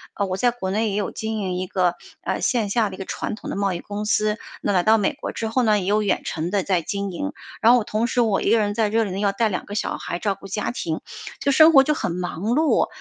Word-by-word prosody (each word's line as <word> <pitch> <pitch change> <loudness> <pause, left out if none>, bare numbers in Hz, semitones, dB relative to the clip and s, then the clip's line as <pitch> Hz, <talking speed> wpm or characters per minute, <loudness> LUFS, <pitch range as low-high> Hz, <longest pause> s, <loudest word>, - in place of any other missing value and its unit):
呃 200 - 0
我 185 -1 -2
在 245 +6 +2
国 210 -6 -4
内 215 +2 +1
也 200 - -2
有 205 -1 -1
经 220 0 -4
营 190 -3 -2
一 185 0 -3
个 180 -2 +1 0.3
呃 - - -2
线 230 -5 +1
下 215 0 +1
的 190 - -8
一 - - -15
个 190 - -6
传 215 - -4
统 - - -8
的 - - -3
贸 200 -1 0
易 175 - -4
公 205 +2 -5
司， 210 0 +1 0.2
那 - - 0
来 185 -3 +3
到 220 +1 +5
美 210 +7 +1
国 290 - -6
之 225 - -3
后 230 +4 +1
呢， 215 -2 +3
也 185 - -4
有 210 +2 +2
远 205 - +1
程 160 +1 -3
地 200 -2 +1
在 185 -2 +1
经 200 +3 -3
营。 290 +11 -3 0.3
然 230 +2 +7
后 240 - +2
同 215 +2 -1
时 245 - +1
我 215 -4 +2
一 - - +1
个 230 - +5
人 205 -1 0
在 215 -1 +1
这 225 +2 +2
里 200 - -4
呢， 190 - -3
要 205 -1 +2
带 220 +3 +1
2 185 - -3
个 205 - -7
小 215 - -2
孩 175 - -4
照 205 -2 0
顾 195 - -12
家 210 +2 -2
庭， 165 -9 -3 0.4
就 280 - +1
生 315 +4 +7
活 270 -2 +8
就 300 - +1
很 235 - -2
忙 175 -2 -4
碌。 280 +9 +2
210 Hz, 315 characters per minute, -23 LUFS, 195-225 Hz, 0.4 s, 活